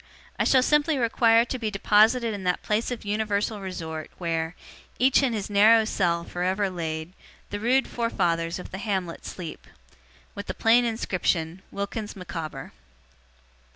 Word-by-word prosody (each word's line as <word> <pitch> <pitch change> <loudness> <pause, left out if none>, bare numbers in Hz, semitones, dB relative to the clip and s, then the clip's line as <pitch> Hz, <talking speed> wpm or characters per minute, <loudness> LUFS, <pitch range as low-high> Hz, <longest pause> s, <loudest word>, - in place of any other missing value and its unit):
I - - +2
shall 260 -1 +5
simply 295 +2 +2
require 230 -1 +4
to 255 +1 -4
be 220 -2 -1
deposited 220 +3 +3
in 200 -2 -6
that 180 -1 0
place 215 +2 0
of 245 -4 -5
universal 210 0 -1
resort, 160 -4 -6
where 165 -1 -2 0.4
Each 265 +2 +4
in 265 -4 +1
his 210 -3 -3
narrow 215 +2 +5
cell 170 -5 0
for 175 - -6
ever 190 +2 0
laid, 160 -1 -4 0.4
The 205 - -3
rude 255 +5 +2
forefathers 175 -8 -1
of 180 - -9
the 190 - -6
hamlet 190 -6 -3
sleep, 170 -4 -8 0.3
' 65 - -30
With 200 0 -7
the - - -4
plain 235 +2 +4
Inscription, 180 -6 -1
'WILKINS 205 +2 -5
MICAWBER. 165 -4 -6
205 Hz, 155 wpm, -26 LUFS, 175-230 Hz, 0.4 s, shall